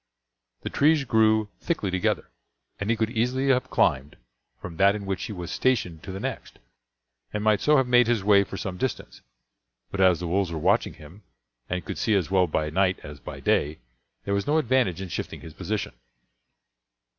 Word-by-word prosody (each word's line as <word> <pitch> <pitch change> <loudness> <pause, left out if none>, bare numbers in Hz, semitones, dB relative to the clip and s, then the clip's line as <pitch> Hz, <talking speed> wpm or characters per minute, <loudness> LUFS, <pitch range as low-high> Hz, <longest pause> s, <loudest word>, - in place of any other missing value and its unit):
The - - -5
trees 150 0 +3
grew 110 -3 +3
thickly 135 - -2
together, 95 -1 -1 0.5
and 100 - -3
he 115 - +3
could 110 0 -1
easily 125 +4 0
have 130 -2 +2
climbed 65 +3 +1 0.4
from 85 -2 -8
that 100 +1 +4
in 100 -1 -6
which 95 -1 -3
he - - -6
was 90 -4 -6
stationed 95 -11 0
to 95 - -8
the 95 - -6
next, - - -6 0.7
and 105 - -3
might 110 -2 +3
so 150 0 +4
have 130 - +3
made 125 -1 +4
his 115 -4 +1
way 100 -1 +5
for 95 - -8
some 95 -2 -5
distance; 130 +6 -4 0.7
but 100 - -2
as 90 -3 +5
the 90 - -4
wolves 95 0 0
were 80 - -3
watching 75 - +1
him, 80 +7 -14 0.5
and 90 -2 -3
could - - -5
see 110 - +2
as 95 -2 0
well 95 -2 +3
by 75 0 -1
night 95 +2 +2
as 75 -1 -9
by - - -8
day, 75 +2 +1 0.5
there 100 - -1
was 100 0 -1
no 150 +2 +3
advantage 125 - +1
in 95 - -7
shifting - - -5
his 80 - -10
position. 100 - -3
100 Hz, 195 wpm, -25 LUFS, 90-115 Hz, 0.7 s, way